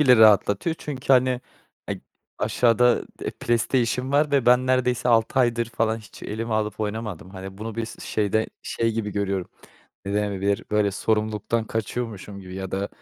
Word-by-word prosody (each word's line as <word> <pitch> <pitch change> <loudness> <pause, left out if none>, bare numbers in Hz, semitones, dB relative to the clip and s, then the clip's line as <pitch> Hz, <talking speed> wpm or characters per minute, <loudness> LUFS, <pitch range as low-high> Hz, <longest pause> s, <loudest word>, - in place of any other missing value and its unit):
bile 130 -4 +7
rahatlatıyor. 110 - +5
Çünkü, 135 -2 -1
hani, 130 -1 +4 0.5
eee, - - -3 0.4
aşağıda, 120 0 +3 0.2
eee, - - -2
PlayStation 125 +2 0
var 145 +1 +3
ve 140 -4 +2
ben 125 +1 +5
neredeyse 125 -1 +1
6 115 +2 +3
aydır 120 -1 +2
falan 115 0 0
hiç 105 -4 -14
elime 110 +1 -3
alıp 105 -1 -1
oynamadım. 105 -4 -4
Hani, 95 0 -8
bunu 110 0 -5
bir 115 - -2
s 115 - -10
şeyde 110 +1 +1 0.2
şey 115 0 -1
gibi 110 -2 -2
görüyorum. 100 -2 -1 0.6
Ne 100 +1 -3
denebilir? 100 -1 0
Böyle 105 -1 +2
sorumluluktan 110 +2 0
kaçıyormuşum 110 -2 -4
gibi 90 -1 -9
ya 95 -1 -5
da 100 +1 -2
110 Hz, 160 wpm, -24 LUFS, 105-120 Hz, 0.6 s, bile